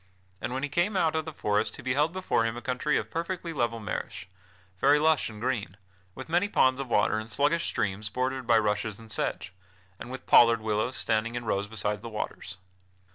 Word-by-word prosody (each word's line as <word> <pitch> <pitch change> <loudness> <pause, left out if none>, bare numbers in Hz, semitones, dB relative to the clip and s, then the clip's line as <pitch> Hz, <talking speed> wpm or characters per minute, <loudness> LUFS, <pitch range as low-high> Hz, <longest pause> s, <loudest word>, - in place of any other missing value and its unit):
And 120 - -3
when 130 +2 -3
he 145 - -1
came 180 +7 +1
out 160 -3 +2
of 160 -1 -1
the 160 - -5
forest 105 -6 0
he - - -10
beheld 140 +5 +1
before 185 -10 0
him 115 +1 -2
a - - -6
country 130 +4 0
of - - -4
perfectly 170 0 -3
level 120 -5 -1
marish, 105 -3 -5 0.5
very 145 +2 +5
lush 155 -2 +2
and 105 -1 -10
green, 115 -6 -2 0.4
with 130 - -8
many 175 +5 +1
ponds 130 -7 +3
of 135 - -3
water 110 -1 +2
and 110 +1 -7
sluggish 145 +8 +2
streams 100 +2 -1
bordered 130 +3 -2
by 115 -2 +5
rushes 105 -1 0
and 115 -1 -12
sedge, 95 -2 -2 0.5
and - - -8
with 130 +1 -7
pollard 115 -1 +6
willows 110 +3 -1
standing 115 +2 0
in 120 -1 -4
rows 100 -1 -1
beside 105 -1 -3
the 115 - -7
waters. 95 -3 -5
120 Hz, 205 wpm, -28 LUFS, 110-145 Hz, 0.5 s, pollard